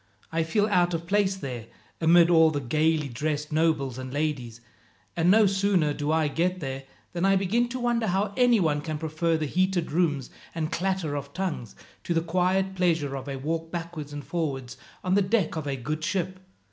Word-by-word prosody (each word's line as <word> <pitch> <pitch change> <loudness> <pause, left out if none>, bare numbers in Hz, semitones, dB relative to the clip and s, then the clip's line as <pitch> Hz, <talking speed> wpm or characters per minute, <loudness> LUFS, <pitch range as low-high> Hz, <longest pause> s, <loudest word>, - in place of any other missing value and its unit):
I 165 0 +1
feel 165 +6 +1
out 180 -4 +2
of 165 0 -4
place 200 +1 +2
there, 125 - -6 0.3
amid 170 +1 +6
all 160 -1 +6
the 150 -2 -2
gaily 150 +3 +1
dressed 150 +4 -3
nobles 150 -5 +1
and 130 0 -6
ladies, 135 -6 -2 0.6
and 170 +1 +2
no 215 +2 +6
sooner 195 -6 +2
do 145 +1 -2
I 160 -1 +2
get 180 +5 0
there, 135 -3 -5 0.3
than 175 0 -2
I 195 0 +4
begin 215 +6 +1
to 255 +1 -4
wonder 240 -2 +1
how 200 +2 0
anyone 205 - +3
can 155 0 -4
prefer 160 +1 0
the 155 - -2
heated 180 +1 0
rooms, 150 -5 0 0.2
and 160 -1 -2
clatter 185 -5 -1
of 140 0 -5
tongues, 170 - -3 0.3
to 170 - -1
the 165 - +3
quiet 185 +3 +1
pleasure 165 -7 +1
of 135 +1 -6
a 135 - -3
walk 160 +4 -3
backwards 165 -4 -5
and 145 -1 -7
forwards 135 -7 -3 0.3
on 185 - 0
the 205 - +4
deck 195 -3 +1
of 155 -2 -4
a 140 - -1
good 150 +5 -4
ship. 185 +1 -2
165 Hz, 195 wpm, -26 LUFS, 145-185 Hz, 0.6 s, amid